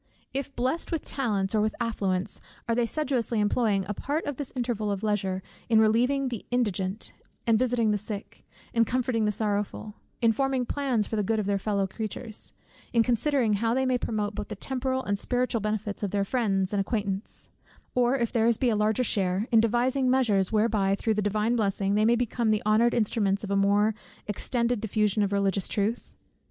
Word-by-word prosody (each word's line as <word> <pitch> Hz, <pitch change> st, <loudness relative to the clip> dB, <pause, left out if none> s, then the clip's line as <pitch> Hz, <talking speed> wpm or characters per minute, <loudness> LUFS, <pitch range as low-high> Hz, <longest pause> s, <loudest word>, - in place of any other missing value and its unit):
If 275 Hz, +1 st, -4 dB
blessed 260 Hz, +7 st, -1 dB
with 325 Hz, -3 st, -2 dB
talents 210 Hz, -8 st, -1 dB
or 215 Hz, -, +3 dB
with 215 Hz, 0 st, 0 dB
affluence, 195 Hz, -5 st, -1 dB, 0.3 s
are 230 Hz, -, +1 dB
they 235 Hz, 0 st, +1 dB
sedulously 255 Hz, -6 st, 0 dB
employing 210 Hz, -2 st, +1 dB
a 210 Hz, -, -2 dB
part 290 Hz, -, -2 dB
of 290 Hz, -4 st, -3 dB
this 285 Hz, -3 st, -5 dB
interval 235 Hz, -4 st, -1 dB
of 200 Hz, 0 st, -2 dB
leisure 190 Hz, -3 st, -1 dB, 0.3 s
in 225 Hz, -2 st, +5 dB
relieving 250 Hz, +5 st, +3 dB
the 235 Hz, -3 st, -5 dB
indigent, 210 Hz, -4 st, -1 dB, 0.3 s
and 225 Hz, -2 st, +3 dB
visiting 240 Hz, -3 st, +2 dB
the 210 Hz, -, +1 dB
sick, 205 Hz, 0 st, -6 dB, 0.3 s
and 230 Hz, -1 st, +3 dB
comforting 245 Hz, -3 st, 0 dB
the 210 Hz, -, +2 dB
sorrowful, 210 Hz, 0 st, -2 dB, 0.3 s
in 230 Hz, -1 st, +4 dB
forming 265 Hz, +1 st, 0 dB
plans 255 Hz, -6 st, 0 dB
for 220 Hz, -, -3 dB
the -, -, +2 dB
good 220 Hz, +3 st, 0 dB
of 215 Hz, -, -1 dB
their 200 Hz, 0 st, 0 dB
fellow 200 Hz, -1 st, 0 dB
creatures, 215 Hz, +2 st, -4 dB, 0.4 s
in 230 Hz, -1 st, +4 dB
considering 245 Hz, -1 st, +2 dB
how 225 Hz, +3 st, +1 dB
they 265 Hz, 0 st, +1 dB
may 255 Hz, -1 st, +1 dB
promote 210 Hz, -3 st, -2 dB
both 210 Hz, 0 st, -5 dB
the 210 Hz, -, -6 dB
temporal 260 Hz, +3 st, -2 dB
and 200 Hz, -1 st, -1 dB
spiritual 245 Hz, -1 st, 0 dB
benefit 215 Hz, -1 st, -2 dB
of 205 Hz, -, -1 dB
their 200 Hz, +1 st, 0 dB
friends 195 Hz, -5 st, 0 dB
and 200 Hz, -, +2 dB
acquaintance: 200 Hz, -1 st, -3 dB, 0.4 s
or 250 Hz, +2 st, +3 dB
if 235 Hz, -3 st, -1 dB
their's 230 Hz, -1 st, +3 dB
be 245 Hz, -1 st, +2 dB
a -, -, +1 dB
larger 215 Hz, +3 st, +2 dB
sphere, 195 Hz, -1 st, 0 dB
in 225 Hz, -, +6 dB
devising 245 Hz, +4 st, +2 dB
measures 220 Hz, -8 st, +2 dB
whereby 210 Hz, -3 st, +2 dB
through 220 Hz, +2 st, 0 dB
the 210 Hz, -, 0 dB
Divine 210 Hz, +3 st, +1 dB
blessing, 200 Hz, -3 st, 0 dB
they 210 Hz, +1 st, +3 dB
may 235 Hz, +2 st, +5 dB
become 235 Hz, -1 st, 0 dB
the 215 Hz, -1 st, +1 dB
honoured 220 Hz, +3 st, +3 dB
instruments 205 Hz, -3 st, +1 dB
of 205 Hz, -, -5 dB
the 200 Hz, -, +1 dB
more 205 Hz, +2 st, +3 dB, 0.3 s
extended 235 Hz, +2 st, 0 dB
diffusion 210 Hz, -1 st, +1 dB
of 200 Hz, -1 st, +1 dB
religious 195 Hz, -1 st, +1 dB
truth? 215 Hz, +3 st, -2 dB
220 Hz, 195 wpm, -27 LUFS, 205-245 Hz, 0.4 s, in